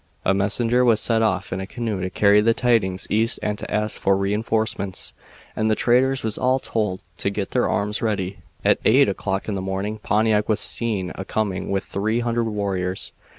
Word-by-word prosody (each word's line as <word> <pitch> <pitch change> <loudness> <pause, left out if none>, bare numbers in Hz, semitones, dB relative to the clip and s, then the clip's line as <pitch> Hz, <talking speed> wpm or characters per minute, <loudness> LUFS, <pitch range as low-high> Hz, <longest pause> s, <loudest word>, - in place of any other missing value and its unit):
A 95 - +4
messenger 115 +5 +1
was 115 -3 +4
sent 115 -1 +1
off 100 -3 0
in 95 - -3
a 95 - -6
canoe 110 -5 -3
to 90 - -2
carry 100 +2 +4
the 115 +1 +3
tidings 110 -7 +1
east 115 +3 +3
and 105 -1 0
to - - -7
ask 105 0 -1
for 95 0 +3
re 100 +1 0
enforcements, 110 -3 -1 0.4
and 110 0 0
the 110 - +3
traders 130 +4 +2
was 110 -2 -3
all 130 +1 +3
told 105 -7 -2
to - - 0
get 100 -1 -4
their - - +1
arms 105 +1 -1
ready. 100 -4 -2 0.3
"At - - +4
eight - - +5
o'clock 95 0 -2
in 105 - -2
the 95 - -2
morning 95 +3 -3
Pontiac 105 0 +1
was 110 - +2
seen 105 -6 -1
a 95 - -6
coming 95 -2 -2
with 95 0 0
three 110 +4 -1
hundred 120 0 0
warriors. 95 -3 -2
105 Hz, 200 wpm, -22 LUFS, 95-115 Hz, 0.4 s, eight